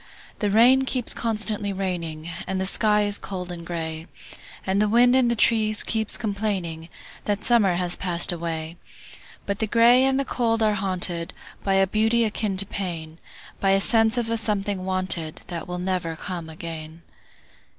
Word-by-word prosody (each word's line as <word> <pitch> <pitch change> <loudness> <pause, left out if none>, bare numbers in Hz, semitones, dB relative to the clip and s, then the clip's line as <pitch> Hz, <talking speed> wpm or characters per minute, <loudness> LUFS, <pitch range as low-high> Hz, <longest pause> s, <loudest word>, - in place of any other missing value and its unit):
The 205 - +1
rain 245 +6 +5
keeps 255 -2 -1
constantly 215 -3 -2
raining, 170 -5 -4 0.2
And 190 0 -2
the 190 - 0
sky 210 +1 +2
is 205 0 0
cold 180 -2 -6
and 170 -1 -7
gray, 160 -1 -5 0.6
And 195 +2 +1
the 210 - +2
wind 245 +3 +5
in 260 -2 +4
the 235 - +1
trees 215 -1 +2
keeps 220 -1 -2
complainingThat 200 -2 -4
summer 215 -7 +3
has 180 0 -1
passed 175 -2 +1
away;—But 170 +4 -7
the 220 - 0
gray 235 +3 +5
and 265 0 +2
the 275 - 0
cold 230 -3 0
are 215 -1 +3
hauntedBy 190 +1 -1
a - - +4
beauty 220 +4 +2
akin 210 -2 -2
to 200 - +4
pain,—By 170 0 -5
a 195 0 +4
sense 225 +3 +3
of 230 -1 -1
a 230 - +1
something 200 -3 -2
wanted, 185 -4 -1
That 175 +1 -5
never 180 -1 -2
will 165 - -5
come 175 -4 -5
again. 160 0 -8
195 Hz, 160 wpm, -24 LUFS, 175-220 Hz, 0.6 s, rain